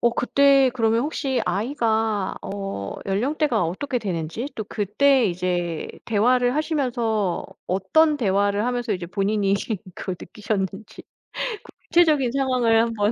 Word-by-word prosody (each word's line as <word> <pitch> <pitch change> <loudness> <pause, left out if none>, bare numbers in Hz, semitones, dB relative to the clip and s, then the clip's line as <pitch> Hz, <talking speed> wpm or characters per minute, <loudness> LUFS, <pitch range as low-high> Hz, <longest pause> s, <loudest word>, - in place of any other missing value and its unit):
어 235 - +3
그때 275 +1 +4
그러면 225 -1 +2
혹시 275 -4 -1
아이가 220 -2 0
어 195 - -5
연령대가 240 - +1
어떻게 250 - -2
되는지 180 - -3
또 215 - -3
그때 235 +6 +2
이제 175 -2 -2 0.2
대화를 245 +3 +2
하시면서 240 - -1 0.2
어떤 295 - +3
대화를 205 -2 +1
하면서 245 -3 -1
이제 180 -2 -4
본인이 200 +1 0 0.4
그걸 185 - -4
느끼셨는지 205 -1 -4 0.9
구체적인 305 -8 +4
상황을 255 -4 +2
한번 225 -2 +1
225 Hz, 290 characters per minute, -23 LUFS, 195-255 Hz, 0.9 s, 그때